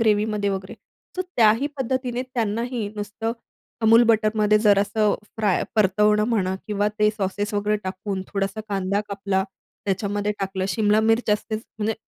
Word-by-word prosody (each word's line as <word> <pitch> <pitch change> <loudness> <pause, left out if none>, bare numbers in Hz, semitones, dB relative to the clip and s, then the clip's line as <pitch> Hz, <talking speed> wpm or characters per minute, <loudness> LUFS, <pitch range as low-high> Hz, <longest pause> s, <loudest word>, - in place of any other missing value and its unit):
ग्रेव्हीमध्ये 210 -2 +2
वगैरे. 190 +2 -4 0.4
तर 370 - 0
त्याही 225 +4 +4
पद्धतीने 255 -1 -1
त्यांनाही 235 -2 -2
नुसतं 210 +2 -3 0.5
Amul 230 +2 +7
बटरमध्ये 215 -1 +3
जरासं 205 0 +2
असं - - +1 0.2
फ्राय, 210 -4 +1
परतवणं 210 +1 +3
म्हणा, 190 -5 +1
किंवा 205 -1 0
ते 210 - +4
सॉसेस 205 0 -3
वगैरे 210 +1 +1
टाकून, 190 +1 -4
थोडासा 195 +1 -2
कांदा 195 0 0
कापला 195 -1 -1 0.4
त्याच्यामध्ये 205 +1 -1
टाकलं. 190 -1 -2
शिमला 210 +2 +2
मिर्च 225 0 +2
असतेच, 215 +1 -1 0.2
म्हणजे 215 +1 0
210 Hz, 140 wpm, -23 LUFS, 200-220 Hz, 0.5 s, Amul